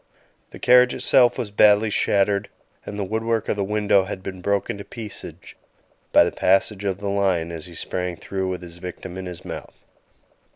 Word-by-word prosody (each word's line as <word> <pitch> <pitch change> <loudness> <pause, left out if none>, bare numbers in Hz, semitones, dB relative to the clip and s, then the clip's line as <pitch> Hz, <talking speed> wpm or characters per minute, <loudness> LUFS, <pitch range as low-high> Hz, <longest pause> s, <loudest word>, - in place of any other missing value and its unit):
The - - -11
carriage 125 0 +5
itself 125 -2 +4
was 105 - -4
badly 105 +1 +5
shattered, 100 0 +1 0.4
and 105 - -6
the 100 - -1
wood 110 +4 -2
work 115 -1 0
of - - +1
the 100 - -1
window 105 -1 +2
had 95 -1 -6
been 95 -2 -7
broken 100 +1 -1
to - - -6
pieces 105 0 -7 0.8
by - - +7
the - - -1
passage 95 +2 +1
of 95 -2 -1
the 100 0 -5
lion 95 -4 0
as 80 0 -7
he 85 - -12
sprang 90 +1 -3
through 95 +2 -4
with 90 -1 -4
his 85 -1 -10
victim 90 0 -8
in 95 0 -6
his 90 -2 -8
mouth. - - -8
100 Hz, 195 wpm, -23 LUFS, 95-105 Hz, 0.8 s, by